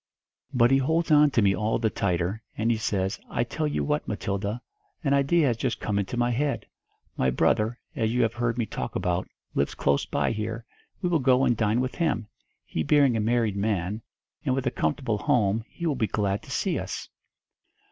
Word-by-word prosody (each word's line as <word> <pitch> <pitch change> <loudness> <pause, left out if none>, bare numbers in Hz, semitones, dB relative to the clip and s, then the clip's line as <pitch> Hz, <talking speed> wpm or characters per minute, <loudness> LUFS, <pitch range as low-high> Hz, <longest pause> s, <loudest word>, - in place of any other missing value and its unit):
But 120 -2 +4
he 135 - +5
holds 160 +5 +1
on 150 0 +7
to 115 -5 +2
me 95 -1 +4
all 105 +4 0
the 110 -2 0
tighter, 90 +2 -1 0.2
and 115 +2 +2
he 115 - +1
says, 100 -2 -1
'I - - 0
tell 150 +6 -2
you 150 - -1
what, 150 0 -1
Matilda, 100 +1 -2 0.5
a 140 - +3
idea 140 +4 +3
has 120 -4 +1
just 120 0 -1
come 100 -1 -1
into 100 +5 -3
my 120 0 +2
head 140 +4 -1 0.5
'My 65 - +2
brother, 110 - +2 0.2
as 110 -5 0
you 125 +1 +2
have 115 0 +1
heard 120 0 -1
me 120 - +1
talk 65 - -5
about, 90 0 -1 0.3
lives 70 - 0
close 70 0 +1
by - - 0
here, 115 +1 -4 0.4
we 180 - +2
will 170 -2 +3
go 130 0 +4
and 120 - +3
dine 110 +2 +1
with 130 0 -2
him. 155 -10 0 0.4
He 80 - -3
being 140 - +4
a - - +1
married 110 -1 +1
man, 100 0 -1 0.4
and 130 - +1
with 135 -1 -2
a 125 - +1
comfortable 105 - -1
home, 110 -1 +2
he 170 - -6
will 160 - +2
be 110 -4 0
glad 100 -1 -1
to - - -15
see - - 0
us.' - - -5
115 Hz, 210 wpm, -26 LUFS, 105-130 Hz, 0.5 s, on